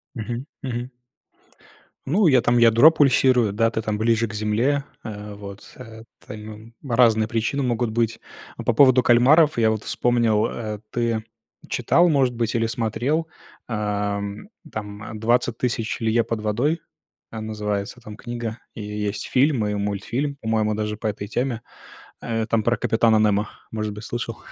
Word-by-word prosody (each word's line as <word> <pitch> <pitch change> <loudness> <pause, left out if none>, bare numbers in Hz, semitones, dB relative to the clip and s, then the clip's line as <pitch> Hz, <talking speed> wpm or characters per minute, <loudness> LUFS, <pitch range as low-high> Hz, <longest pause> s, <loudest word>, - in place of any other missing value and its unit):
Мгм, 120 +2 -4 0.2
мгм. 125 0 -4 1.1
Ну, 180 +8 +3
я 130 -5 +5
там 120 +1 +2
ядро 115 +6 +7
пульсирую, 130 -7 +3
да, 115 +2 +2
ты 110 - -2
там 110 -1 -2
ближе 115 +1 +2
к 105 - -9
земле. 110 +7 0 0.2
А, 105 -2 -7
вот, 100 0 -11
а, 110 0 -11 0.3
там 110 +1 -10
разные 115 -3 +3
причины 115 +4 -1
могут 120 -2 0
быть. 115 0 0 0.4
А - - -6
по 120 - +1
поводу 130 +1 +6
кальмаров 135 +6 +5
я 110 -1 +4
вот 110 -1 -3
вспомнил, 115 -3 +2
э: 110 -3 -5
ты 115 -2 -1 0.5
читал, 175 +1 +3
может 135 -5 +2
быть, 115 -1 -1
или 115 -1 +2
смотрел, 120 +8 -1 0.4
а, 105 -2 -1
м, 100 - -6 0.2
там, 105 -1 -7
"Двадцать 120 +1 +1
тысяч 120 -2 -2
лье 115 +1 +2
под 115 -2 -3
водой", 125 +10 0 0.5
а, 110 - -6
называется 105 +1 -4
там 105 -2 -10
книга, 120 -2 -5 0.2
и - - -8
есть 105 0 -4
фильм 130 -3 +2
и 105 - -1
мультфильм. 105 +8 -2
По-моему, 110 -1 0
даже 105 0 -3
по 110 - -3
этой 100 -1 -4
теме. 120 0 -2 0.6
Э, 115 -1 -2
там 115 -1 +1
про 120 +2 +2
капитана 110 -1 +3
Немо. 105 0 +1 0.2
Может 110 -1 -3
быть, 105 +1 -9
слышал. 120 -1 -4
115 Hz, 160 wpm, -23 LUFS, 105-120 Hz, 1.1 s, ядро